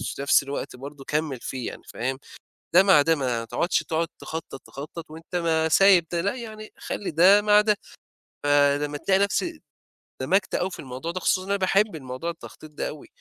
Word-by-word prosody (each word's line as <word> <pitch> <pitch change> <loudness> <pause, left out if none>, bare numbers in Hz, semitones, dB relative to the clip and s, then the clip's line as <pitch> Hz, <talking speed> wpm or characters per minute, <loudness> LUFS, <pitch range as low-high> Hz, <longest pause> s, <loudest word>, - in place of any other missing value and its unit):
وفي - - -4
نَفس 140 - +4
الوقت 140 -1 -5
برضه 140 +2 -10
كمّل 150 -4 -2
فيه 130 -1 -5
يعني - - -11
فاهم، 130 +3 -3 0.6
ده 180 +2 +8
مع 190 -7 +6
ده 165 +3 +3
ما 125 -5 -2
تقعُدش 170 +9 0
تقعُد 165 0 -1
تخطّط، 160 -4 -7
تخطّط 155 +3 -9
وأنت 165 +3 -10
ما 160 -2 +1
سايب 190 0 +6
ده، 170 -1 0
لأ 200 +6 -1
يعني 215 -3 -9
خلّي 205 - -4
ده 185 +6 +6
مع 210 0 +5
ده. 210 0 +2 0.7
فلمّا 145 0 +2
تلاقي 190 +5 +2
نفسي 310 - -1 0.6
اندمجت 190 0 +1
أوي 185 +2 -1
في - - -9
الموضوع 130 +5 -5
ده 185 - -4
خصوصًا 185 +1 +1
إن - - -9
أنا 200 - +2
باحب 195 +1 +2
الموضوع 130 +2 -5
التخطيط 160 -2 -10
ده 150 - -4
أوي. 150 - -10
165 Hz, 190 wpm, -25 LUFS, 145-190 Hz, 0.7 s, ده